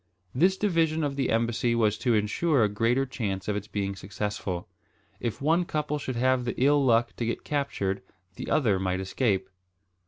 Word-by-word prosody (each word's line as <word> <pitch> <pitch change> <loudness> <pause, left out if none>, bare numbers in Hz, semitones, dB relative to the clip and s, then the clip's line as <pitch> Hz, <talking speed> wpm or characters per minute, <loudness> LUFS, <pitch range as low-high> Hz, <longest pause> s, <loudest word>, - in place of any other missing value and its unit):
This 185 +8 +3
division 165 -6 +1
of 140 -2 -1
the 135 -2 0
embassy 115 +1 +1
was 110 -2 +2
to 120 -3 +2
insure 120 +6 +2
a - - +4
greater 115 +6 +1
chance 100 -8 -4
of 105 - 0
its 105 0 -4
being 100 -2 -2
successful. 95 -2 -4 0.5
If 120 +2 -4
one 165 +4 +3
couple 150 -3 -2
should 130 -3 -4
have 130 +1 +2
the 120 - -3
ill 140 +2 +4
luck 120 -2 +3
to 120 - -1
get 115 - -3
captured, 140 -10 -1 0.3
the - - -6
other 110 -11 +2
might 95 0 -1
escape. 95 0 0
120 Hz, 180 wpm, -27 LUFS, 105-140 Hz, 0.5 s, a